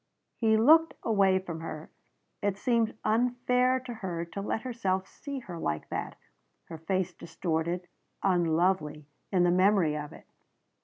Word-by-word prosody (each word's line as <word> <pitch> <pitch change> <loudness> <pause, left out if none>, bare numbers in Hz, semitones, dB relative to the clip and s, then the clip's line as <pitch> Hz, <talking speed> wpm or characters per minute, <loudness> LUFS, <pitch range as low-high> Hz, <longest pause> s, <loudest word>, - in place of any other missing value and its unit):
He 220 -2 +3
looked 320 +8 +5
away 195 -4 +3
from 175 -4 -5
her. 160 -1 -7 0.5
It 200 -1 0
seemed 230 -2 +1
unfair 250 +3 +2
to 250 -1 -7
her 180 -6 -4
to 200 +4 -6
let 220 +2 -2
himself 195 -7 -1
see 280 -1 -7
her 175 -7 -8
like 75 - -3
that - - -4 0.5
her 165 -1 -7
face 185 +2 -1
distorted 170 +1 -3 0.4
unlovely 170 -4 +1 0.3
in 185 -3 +3
the 175 - +4
memory 185 -4 +3
of 150 -1 -5
it. - - -14
190 Hz, 145 wpm, -29 LUFS, 170-225 Hz, 0.5 s, looked